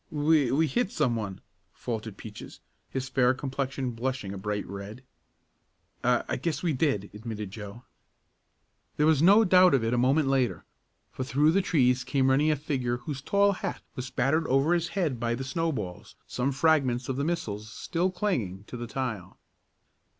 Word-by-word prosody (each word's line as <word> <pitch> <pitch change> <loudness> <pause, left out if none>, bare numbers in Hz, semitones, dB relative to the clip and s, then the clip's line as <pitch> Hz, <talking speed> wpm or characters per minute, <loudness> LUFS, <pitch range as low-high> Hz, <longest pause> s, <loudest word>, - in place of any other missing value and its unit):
"We 150 -3 +2
we 155 +4 +3
hit 190 - 0
some 140 - +1
one," 100 -4 -5 0.3
faltered 110 -3 -5
Peaches, 105 -1 -10 0.3
his 130 0 -3
fair 130 -1 +3
complexion 135 -1 -3
blushing 120 -3 -3
a - - -6
bright 105 +1 -3
red. 100 +5 -8 1.0
"I 125 0 +3
I - - -1
guess 165 -1 -2
we 170 -3 +1
did," 130 -8 0
admitted 105 -2 -6
Joe. 105 +3 -9 1.1
There 150 - +3
was 155 -2 +4
no 200 +6 +7
doubt 185 -5 +6
of 125 - +1
it 115 +1 0
a 120 - +2
moment 135 +4 +3
later, 135 -3 0 0.5
for 130 - -4
through 145 +4 +3
the 195 +4 +3
trees 125 -8 +2
came 135 -2 +2
running 145 +4 +3
a 155 - +3
figure 130 -4 -2
whose 135 +2 -6
tall 200 +6 +3
hat 190 - -4
was 130 +1 -5
battered 135 +6 +1
over 135 +6 +3
his 170 -1 +1
head 170 -10 -1
by 120 0 0
the 130 - -5
snowballs, 130 - -3
some 125 +2 -1
fragments 135 -4 +2
of 130 - -2
the 140 - -1
missiles 110 -10 -3
still 175 - -1
clinging 130 - -2
to 125 - -8
the 120 0 -5
tile. 115 -8 -4
130 Hz, 175 wpm, -28 LUFS, 115-155 Hz, 1.1 s, no